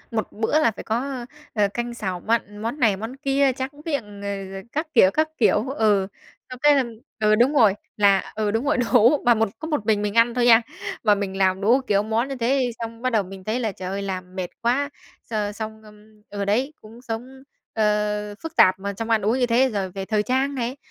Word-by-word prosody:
một 220 - -2
bữa 225 +8 +1
là 230 -7 +3
phải - - -9
có, 225 +2 -1
ơ, 265 -2 -5 0.3
ờ, 210 -2 +2
canh, 240 +3 -4
xào, 190 -6 -4
mặn, 210 0 -1
món 230 +7 -3
này 215 -6 +3
món 225 +5 -6
kia, 275 0 +2
tráng 260 +1 -4 0.2
miệng, 210 -10 -4
ờ, 200 -1 -4
rồi 195 0 -8
các 310 +2 -2
kiểu, 190 -7 +6
các 310 +5 +1
kiểu, 220 +1 +2
ừ, 210 -7 +2 0.4
xong 255 -1 -8
cái 295 0 +6
là 275 - +3 0.4
ừ, 215 0 +4
đúng 250 +6 +3
rồi, 220 -8 +5 0.2
là 200 -2 +3
ừ, 215 -1 0
đúng 225 +5 -1
rồi, 290 -1 +2
đủ. 245 +3 +4
Mà 240 - +6
một 225 -2 +1
có 315 - -5
một 295 -10 -2
mình 215 -2 +2
mình 210 -1 -2
ăn 235 +1 +5
thôi 245 0 +1
nha, 230 -1 +7 0.4
mà 210 -2 +5
mình 195 -1 -4
làm 190 0 +2
đủ, 240 +7 +4
kiểu, 200 0 +2
món 225 +4 0
như 275 - -4
thế 250 +1 +1
xong 230 0 -6
bắt 255 - +1
đầu 220 -4 +1
mình 190 0 -10
thấy 220 +5 -1
là, 225 -3 -1
trời 185 -1 -7
ơi, 195 +1 -3
làm 185 -1 -5
mệt 185 -1 -3
quá, 260 +5 +1 0.4
x - - -9 0.2
xong 220 0 -6 0.5
ờ, 200 -1 -3
đấy 255 +9 0
cũng 225 +3 -14
sống, 255 +3 -7 0.3
ờ, 210 -1 0
phức 325 0 -8
tạp 185 0 +5
mà 200 +1 -4
trong 225 +3 -5
ăn 225 -1 +3
uống 225 +6 +1
như 245 - +3
thế. 245 +3 +3
Rồi 195 -5 -3
về 195 0 -5
thời 210 -1 0
trang 265 +3 0
này, 250 +2 -3
225 Hz, 235 wpm, -23 LUFS, 205-255 Hz, 0.5 s, nha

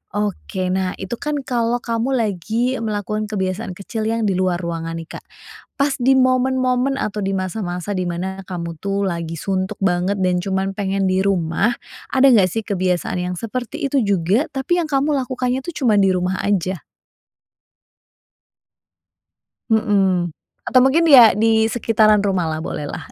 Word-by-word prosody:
Oke. 195 -2 -2
Nah, 185 -1 -1
itu 190 +4 -6
kan 300 0 -2
kalau 240 -1 0
kamu 235 +3 -1
lagi 225 +3 -1
melakukan 215 -1 -3
kebiasaan 190 -1 -3
kecil 215 +3 -4
yang 225 0 0
di 200 - +1
luar 185 -1 +1
ruangan 165 -1 -4
nih 165 - -7
Kak. - - -27 0.6
Pas 280 0 +2
di 260 +1 +3
momen-momen 255 +1 +2
atau 210 0 -3
di 195 - -1
masa-masa 185 0 -3
di 185 - -1
mana 185 +2 -4
kamu 170 -3 -6
tuh 200 0 -1
lagi 165 -2 -4
suntuk 190 +2 -2
banget 185 +1 +1
dan 180 -1 +1
cuma 190 0 -1
pengen 195 -1 -1
di 185 0 +2
rumah, 190 +2 +1 0.4
ada 270 +1 +5
enggak 205 -8 +5
sih 225 - -2
kebiasaan 185 -3 -1
yang - - -3
seperti 240 +3 -5
itu 275 -1 +1
juga, 200 - +1
tapi 275 +6 -1
yang 310 - -6
kamu 285 +2 +1
lakukannya 255 0 -2
tuh 345 - -5
cuma 245 -8 +1
di 195 -1 +4
rumah 185 +1 -1
aja? 185 -3 -1 2.9
Mhm, 195 -5 +2 0.4
atau 255 - +5
mungkin 325 +5 +3
ya 245 -7 +9
disekitaran 220 0 +3
rumah 195 -3 0
lah 155 - -3
boleh 150 - -5
lah. - - -7
205 Hz, 155 wpm, -20 LUFS, 185-240 Hz, 2.9 s, ya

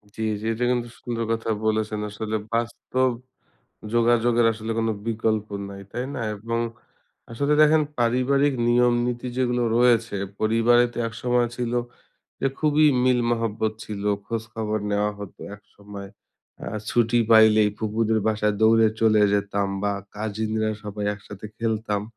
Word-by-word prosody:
জি, 110 - -6 0.2
জি - - -6
এটা 120 +2 -3
কিন্তু 120 -1 -1
সুন্দর 115 -1 -3
কথা 115 0 -2 0.2
বলেছেন। 110 -1 0
আসলে 110 +1 -4 0.2
বাস্তব 120 +2 0 0.8
যোগাযোগের 120 0 +3
আসলে 110 +1 -5
কোনো 115 0 +1
বিকল্প 110 -2 0 0.2
নাই। 100 0 -9
তাই 125 +1 -3
না? 130 - -4 0.2
এবং 115 +3 -3 0.7
আসলে 140 +6 0
দেখেন 155 0 +5 0.2
পারিবারিক 130 +4 +2
নিয়ম 120 0 +4
নীতি 125 +1 -3
যেগুলো 125 -1 +1
রয়েছে 120 -3 +3 0.2
পরিবারে 115 +2 +4
তো - - -8
একসময় 120 +1 0
ছিল 120 -1 -2 0.7
এ - - +4
খুবই 155 0 +3 0.2
মিল 125 -1 +3
মহব্বত 110 -2 -1
ছিল। 100 -2 -6 0.2
খোঁজখবর 110 -1 -3
নেওয়া 105 +1 +1
হতো 100 -2 -10 0.2
একসময়। 100 -1 -11 0.6
আর 105 +1 -3
ছুটি 120 0 +2
পাইলেই 110 -1 +6
ফুফুদের 110 0 0
বাসায় 105 -1 +1
দৌড়ে 110 0 +5
চলে 110 -1 +4
যেতাম 100 0 0
বা 100 - +1 0.2
কাজিনরা 110 +1 -2
সবাই 105 0 -5
একসাথে 105 +1 -10
খেলতাম। 110 -2 -1
115 Hz, 135 wpm, -24 LUFS, 105-120 Hz, 0.8 s, পাইলেই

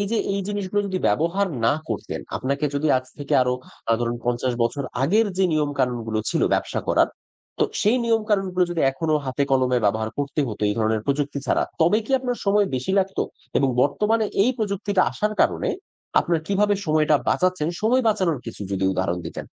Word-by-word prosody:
এই 200 - 0
যে, 230 - +1 0.2
এই 200 - -1
জিনিসগুলো 205 0 -1
যদি 190 -1 -2
ব্যবহার 175 +6 +1 0.2
না - - +5 0.2
করতেন, - - -4 0.2
আপনাকে 140 +3 -2
যদি 145 +2 0
আজ 130 - -2
থেকে 145 -1 -2
আরো 125 0 +1 0.4
আ - - +6
ধরুন 120 0 -1
৫০ 120 +1 0
বছর 140 +4 -1 0.2
আগের 210 +10 +3
যে 190 - +4
নিয়মকানুনগুলো 125 -7 0
ছিল - - 0
ব্যবসা - - -1
করার; - - +4 0.5
তো - - +4 0.2
সেই 215 +5 +3
নিয়মকানুনগুলো 205 -5 +1
যদি, 170 - -2
এখনো 155 +3 -1
হাতে 130 +2 -1
কলমে 130 -2 +3
ব্যবহার 110 +2 +1
করতে 145 +1 -1
হত, 105 - -7
এই 105 - 0
ধরনের 110 0 +1
প্রযুক্তি 140 0 -1
ছাড়া, - - +2 0.2
তবে 190 +7 +4
কি - - -11
আপনার 250 -2 -3
সময় 205 0 +3
বেশি 130 +9 -2
লাগতো? 190 0 0 0.4
এবং 135 - +2
বর্তমানে 215 +10 +1 0.2
এই 245 - +3
প্রযুক্তিটা 200 -2 0
আসার 210 0 -1
কারণে - - +2 0.5
আপনার 170 -2 0
কিভাবে 205 +2 +2
সময়টা 155 -1 +3
বাঁচাচ্ছেন? 185 -4 +1
সময় 245 +4 +3
বাঁচানোর 185 -8 +1
কিছু 115 - -8
যদি 95 0 -1
উদাহরণ 95 -1 -1
দিতেন। - - -7
155 Hz, 180 wpm, -23 LUFS, 130-205 Hz, 0.5 s, আ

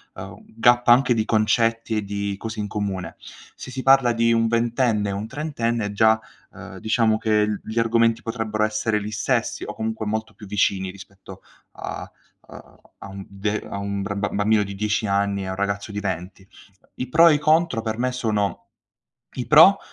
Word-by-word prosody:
uhm, - - -9
gap 120 +2 +2
anche 125 +1 +5
di 110 -2 0
concetti 115 0 +1
e 105 - -1
di 100 0 -3
cose 115 0 -6
in 105 - -2
comune. 95 -4 -4 0.4
Se - - -9
si 130 +1 -5
parla 135 -3 +5
di 115 0 +2
un 115 0 +2
ventenne 115 -2 +1
e - - -2
un 100 +2 -4
trentenne 120 -7 -2
già, 110 +1 +3 0.3
uhm, - - -10
diciamo 110 0 +2
che 105 -1 +2
l 105 -1 -3
gli 110 - -7
argomenti 115 0 +2
potrebbero 110 -2 -2
essere 110 0 0
li 105 +1 -6
stessi, 115 +3 -1
o 105 - -6
comunque 110 0 -3
molto 110 +1 -3
più 105 - -13
vicini 95 -1 0
rispetto 100 0 -13 0.3
a - - -7 0.3
a - - -14 0.2
a - - -9
un 95 0 -9
de 105 +2 -3
a - - -4
un 100 0 -3
br 100 +1 -4
ba 105 - 0
bambino 105 +1 +2
di 100 0 -7
10 105 +1 -1
anni 100 0 0
e - - -6
a - - -4
un 95 - -4
ragazzo 100 +1 -3
di 105 - -3
20. 95 +2 -5 0.5
I 125 - -4
pro 165 +6 +6
e 150 - +4
i - - -1
contro 155 -5 +2
per 110 0 -3
me 125 +1 0
sono: 105 -5 -2 0.7
i 125 - -4
pro, 165 +6 +7
110 Hz, 195 wpm, -23 LUFS, 100-115 Hz, 0.7 s, pro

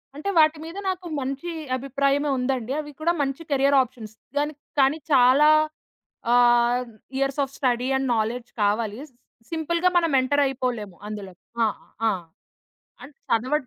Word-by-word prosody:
అంటే 305 +7 -4
వాటి 310 0 +5
మీద 330 +4 -8
నాకు 365 -1 -4
మంచి 275 +6 -4 0.3
అభిప్రాయమే 275 +2 0
ఉందండి. 250 -1 -1
అవి 295 -1 -6
కూడా 340 +2 +2
మంచి 275 +2 -2
కెరియర్ 280 0 +4
ఆప్షన్స్ 225 -4 -7 0.3
దానికి 295 0 -3 0.2
కానీ 270 +3 +3
చాలా 265 +3 +6 0.8
ఆహ్, 240 0 +4 0.3
years 275 +1 -1
of 275 0 -6
study 250 -2 0
and 265 0 -1
knowledge 235 +3 -2
కావాలి 210 +2 0
స్ - - -32 0.4
సింపుల్‌గా 335 +2 +1
మనం 335 -2 +2
ఎంటర్ 285 +3 +2
అయిపోలేము 245 -7 -3
అందులో. 205 -3 -7 0.3
ఆ! - - +5 0.4
ఆ! - - +5 0.9
అండ్ 285 - -12 0.2
చదవ 235 +4 +1
270 Hz, 140 wpm, -24 LUFS, 240-295 Hz, 0.9 s, చాలా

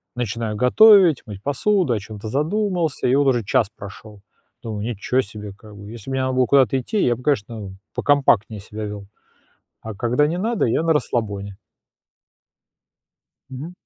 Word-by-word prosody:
начинаю 115 -2 -3
готовить, 180 - +6
мыть 100 -2 -10
посуду, 175 +3 +1
о 110 - -1
чем-то 105 +1 -8
задумался 170 - -1
и 125 - +3
вот 145 0 +3
уже 120 -3 +2
час 105 +2 +1
прошел. 100 +1 -11 0.4
Думаю: 110 -3 -5
"Ничего 120 +3 -1
себе!" 105 -2 -9
Как 105 0 -15
бы 100 +1 -11
если 120 +2 -10
бы - - -3
мне 130 - 0
надо 130 0 -1
было 130 0 +3
куда-то 135 -1 +3
идти, 200 - -1
я 120 -1 +2
бы, 125 - -13
конечно, 105 -7 -2 0.2
покомпактнее 115 -7 +2
себя 110 +1 -7
вёл, 105 -1 -7 0.8
а 110 -1 -7
когда 120 +8 +1
не 165 +4 -2
надо- 225 +3 0
я 120 +6 +1
на 165 0 +2
расслабоне. 100 -8 -3 1.9
Мгм. 135 +6 -8
120 Hz, 165 wpm, -21 LUFS, 105-145 Hz, 1.9 s, готовить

